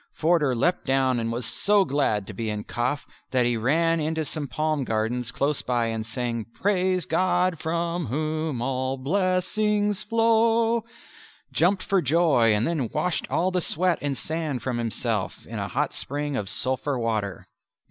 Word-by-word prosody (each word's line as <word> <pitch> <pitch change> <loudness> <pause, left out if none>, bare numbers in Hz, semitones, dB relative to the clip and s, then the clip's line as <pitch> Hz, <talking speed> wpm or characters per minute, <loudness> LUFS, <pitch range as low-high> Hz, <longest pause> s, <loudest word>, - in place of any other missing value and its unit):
Forder 155 -5 +2
leapt 175 +10 +1
down 130 -2 +2
and 115 0 -2
was 120 0 -3
so 205 - +3
glad 130 - +1
to 110 - -7
be 110 +3 -3
in 105 0 -3
Kaf 125 +4 -2 0.2
that 125 -2 +2
he 120 0 +2
ran 165 +8 +2
into 160 0 -1
some 150 -1 -4
palm 155 0 -1
gardens 115 +1 -1
close 145 0 0
by 120 -2 0
and 110 -1 -2
sang 115 -1 -3
"Praise 185 -3 +1
God 180 0 +1
from 170 0 -1
Whom 155 0 -2
all 130 +1 -1
blessings 200 +6 +1
flow," 230 0 +3 0.7
jumped 185 +3 +2
for 195 -3 +2
joy, 145 -6 +4
and 105 +2 +2
then 150 -9 -1
washed 180 -2 -1
all 185 +2 +1
the 180 -1 +1
sweat 175 +2 +1
and 140 -2 -1
sand 155 -5 -3
from 125 -2 -1
himself 115 -3 -2
in - - -6
a - - -2
hot - - -1
spring 145 0 -3
of 100 -6 -3
sulphur 130 +3 -1
water. 105 -5 -2
150 Hz, 165 wpm, -25 LUFS, 120-180 Hz, 0.7 s, joy